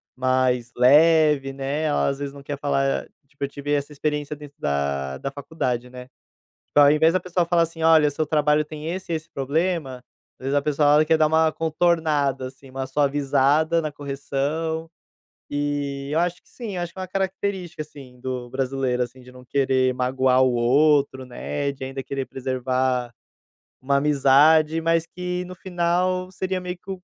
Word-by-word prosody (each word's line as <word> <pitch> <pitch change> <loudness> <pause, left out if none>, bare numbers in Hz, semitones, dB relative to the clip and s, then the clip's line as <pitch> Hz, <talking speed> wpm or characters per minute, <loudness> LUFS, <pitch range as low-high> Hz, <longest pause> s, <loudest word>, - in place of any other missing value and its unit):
mais 130 -2 +1
leve, 150 +1 +5
né, 140 +3 -3
ela 150 - +1
às 140 0 -3
vezes 140 -1 -4
não 140 -1 -12
quer 145 0 -5
falar, 70 - 0 0.2
tipo, 140 0 -9
"eu - - +1
tive 145 +1 -5
essa 145 +1 -1
experiência 150 0 -2
dentro 145 -1 -13
da 70 -2 -1
da 135 - -5
faculdade" 130 -4 -3
né? 125 0 -11 0.6
Tipo 145 - +2
ao 145 0 +8
invés 160 +2 +4
da 185 - +2
pessoa 180 0 -1
fala 170 0 +2
assim: 165 0 -5
"Olha, 160 -2 +6
o 145 - 0
seu 155 +2 -1
trabalho 150 0 +2
tem 155 +1 -7
esse 185 -2 -6
e - - +1
esse 160 +1 -6
problema", 140 -1 -2 0.4
às - - -10
vezes 135 - -1
a 145 - +3
pessoa 145 0 +3
ela 155 +1 +4
quer 160 0 +3
dar 155 - +4
uma 160 0 +3
contornada, 155 -5 0
assim, 135 +1 -14
uma 130 0 -5
suavizada 145 +3 +2
na 155 -1 -3
correção, 145 +3 -3 0.6
eh, 145 -1 -2
eu 160 - +2
acho 175 +1 -1
que - - -27
sim, 225 -6 -7
acho 175 -1 -3
que - - -22
é - - -3
uma 185 - -5
característica 190 -3 -3
assim 135 -4 -14
do 125 -1 -5
brasileiro, 130 -1 -1
assim, 125 +2 -10
de 125 0 -14
não 125 0 -14
querer 130 -1 +1
magoar 130 0 +2
o 130 -1 +2
outro, 135 +2 +3
né, 140 +3 -3
de 140 -1 -10
ainda 135 +1 -5
querer 135 -1 -4
preservar 130 -1 -1 0.7
uma 140 +2 +1
amizade 150 +3 +4
mas 165 0 +1
que 180 +1 -4
no 185 - -8
final 185 +1 -1
seria 190 0 -3
meio 180 0 -5
que 195 - -11
145 Hz, 185 wpm, -23 LUFS, 130-160 Hz, 0.7 s, ao